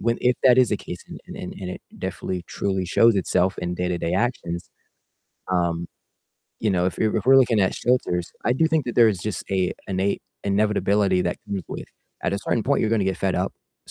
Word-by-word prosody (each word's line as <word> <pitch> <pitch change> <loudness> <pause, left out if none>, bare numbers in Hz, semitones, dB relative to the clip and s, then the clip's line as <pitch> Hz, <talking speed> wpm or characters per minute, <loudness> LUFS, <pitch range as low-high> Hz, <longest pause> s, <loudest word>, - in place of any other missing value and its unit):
when 115 +1 0
if 125 0 +3
that 130 -1 +7
is 125 -2 +5
the 105 - +2
case 90 -2 -7
and, - - -8
and 90 - -7
and 90 -2 -5
it - - -7 0.2
definitely 90 -2 -4
truly 95 -2 -1
shows 115 +5 +4
itself 90 0 +1
in 90 0 -2
day-to-day 90 -1 -1
actions, 85 -8 -2 0.8
um, 85 -1 0 0.7
you 110 - +1
know, 90 -1 +2
if 90 - -3
you're 110 0 +1
if 105 - -1
we're 135 - +8
looking 120 -5 +4
at 95 - +2
shelters, 90 -8 0
I 120 - +3
do 145 +6 +3
think 160 -3 +1
that 120 - -3
there 115 -2 +7
is 100 -5 0
just 105 0 -4
a 95 -2 +1 0.2
innate 95 +1 0 0.2
inevitability 100 -2 +2
that 90 0 -1
comes 100 -3 -3
with, - - -6 0.4
at - - 0
a - - -1
certain 115 - 0
point, 140 +1 +2
you're 110 - +1
gonna 105 -4 +2
get 95 -2 0
fed - - 0
up. - - -1 0.3
At - - -11
100 Hz, 215 wpm, -24 LUFS, 90-115 Hz, 0.8 s, we're